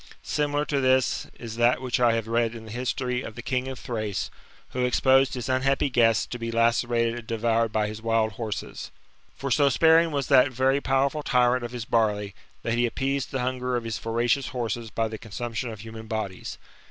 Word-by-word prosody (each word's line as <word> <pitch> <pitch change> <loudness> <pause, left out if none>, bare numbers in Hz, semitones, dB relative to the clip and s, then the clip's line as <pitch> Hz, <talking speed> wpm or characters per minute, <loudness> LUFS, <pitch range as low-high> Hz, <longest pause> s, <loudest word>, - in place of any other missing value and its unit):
Similar 145 0 0
to 140 -2 0
this 130 0 +2
is 115 -1 -8
that 120 +1 +3
which 130 -1 -1
I 120 -2 +4
have 115 -1 -2
read 115 0 +1
in 110 -1 -9
the 110 - -10
history 125 +1 -2
of 110 - -8
the - - -8
king 130 -1 -1
of 130 -2 -6
Thrace^ 110 -5 -3 0.4
who 125 - -2
exposed 130 +2 +3
his 125 -1 -4
unhappy 135 +1 +1
guests 115 -3 +3
to 120 - -7
be 115 0 -3
lacerated 115 0 +1
and 110 - -13
devoured 115 0 +1
by 110 -1 +1
his 110 +1 -7
wild 115 -1 +1
horses. 110 0 -5 0.5
For 135 -1 -4
so 140 +2 +4
sparing 160 +4 +5
was 140 -3 -1
that 135 -1 +5
very 130 +3 +2
powerful 135 +3 +1
tyrant 125 -2 +2
of 120 - -4
his 120 -2 -5
barley, 105 -4 +1 0.3
that 115 - -1
he 120 0 +2
appeased 135 +2 -2
the 135 -3 -2
hunger 125 0 -1
of 120 - -1
his 110 -4 -4
voracious 120 +5 0
horses 120 -3 -3
by 115 +1 -1
the 110 -1 -7
consumption 120 +3 -4
of 110 -3 -8
human 110 0 -9
bodies. 110 -4 -4
120 Hz, 200 wpm, -26 LUFS, 115-130 Hz, 0.5 s, sparing